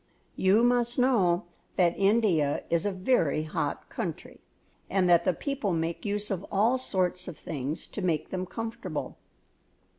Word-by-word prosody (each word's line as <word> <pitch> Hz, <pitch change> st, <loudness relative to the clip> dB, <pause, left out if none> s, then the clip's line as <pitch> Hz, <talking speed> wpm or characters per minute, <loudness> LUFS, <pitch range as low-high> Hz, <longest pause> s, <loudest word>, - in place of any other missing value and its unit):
You 195 Hz, +5 st, +4 dB
must 240 Hz, 0 st, +2 dB
know 210 Hz, -10 st, +3 dB, 0.3 s
that 175 Hz, -2 st, +3 dB
India 195 Hz, -8 st, +2 dB
is 170 Hz, +3 st, +2 dB
a -, -, 0 dB
very 185 Hz, -, +1 dB
hot 155 Hz, -, -3 dB
country -, -, -5 dB, 0.5 s
and 185 Hz, -1 st, +2 dB
that 170 Hz, -1 st, +5 dB
the -, -, +4 dB
people 265 Hz, -, -2 dB
make 165 Hz, +3 st, -2 dB
use 205 Hz, 0 st, -2 dB
of 190 Hz, -1 st, -2 dB
all 225 Hz, +6 st, +3 dB
sorts 185 Hz, -6 st, -1 dB
of 180 Hz, -, -7 dB
things 150 Hz, 0 st, -4 dB
to 210 Hz, -, -7 dB
make 165 Hz, -5 st, 0 dB
them 185 Hz, 0 st, -3 dB
comfortable. 230 Hz, +3 st, -5 dB
190 Hz, 150 wpm, -28 LUFS, 170-225 Hz, 0.5 s, that